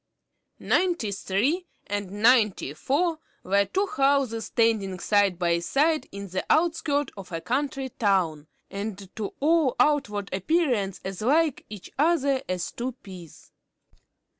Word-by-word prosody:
Ninety 345 - +1
three 260 - -1 0.2
and 205 -1 -3
Ninety 210 - +3
four 315 - 0 0.2
were 200 +2 +2
two 385 - 0
houses 275 - +1
standing 220 -5 +1
side 200 -2 +2
by 170 -1 +1
side 300 - +1
in 200 0 -7
the 185 0 -3
outskirts 310 -3 +1
of 195 -2 -10
a 165 - -3
country 270 - -2
town, 180 -10 0 0.2
and 200 -1 -6
to 210 -3 -5
all 310 -2 +3
outward 210 -10 +1
appearance 215 - 0
as 190 0 -5
like 300 +5 +2
each 210 -3 -10
other 285 -4 +2
as 185 -1 -2
two 250 +2 -4
peas. 180 -5 -12
225 Hz, 130 wpm, -26 LUFS, 195-290 Hz, 0.2 s, Ninety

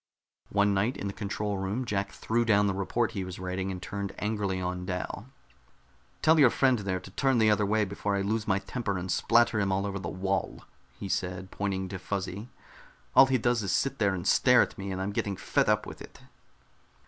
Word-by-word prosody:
One 100 0 +2
night 105 +6 0
in - - -5
the 100 - -3
control 105 -1 -3
room 100 +7 -2
Jack 100 -3 -2
threw 115 +1 0
down 105 -3 +3
the 100 - +1
report 105 +5 -1
he 95 - -3
was 90 -1 -7
writing 95 +1 -3
and 95 -1 -4
turned 100 +1 -5
angrily 105 -3 -1
on 90 0 -3
Dal. 90 +4 -4 1.0
"Tell 160 0 +5
your 135 -4 +7
friend 130 -1 +2
there 95 -2 -2
to 95 +1 -12
turn 135 +5 +1
the 110 -2 +4
other 105 -1 +2
way 110 +1 +2
before 100 +1 -2
I 100 - 0
lose 110 +2 -1
my 95 -2 +3
temper 100 0 -3
and 90 0 -4
splatter 115 +1 +3
him 100 -2 +1
all 95 +1 0
over 100 0 -3
the - - -5
wall," 95 0 -2 0.3
he 100 - -6
said, 90 0 -3
pointing 95 -2 -2
to 95 0 -6
Fuzzy. 100 +3 -4 0.7
"All 135 - +9
he 130 -1 +2
does 120 0 +1
is 100 - -2
sit 135 0 0
there 100 -3 +2
and 85 - -4
stare - - +5
at - - -6
me 100 0 -5
and 95 - -3
I'm 95 +2 -2
getting 100 -1 -2
fed - - +1
up - - +2
with - - -10
it." - - -12
100 Hz, 220 wpm, -28 LUFS, 95-110 Hz, 1.0 s, All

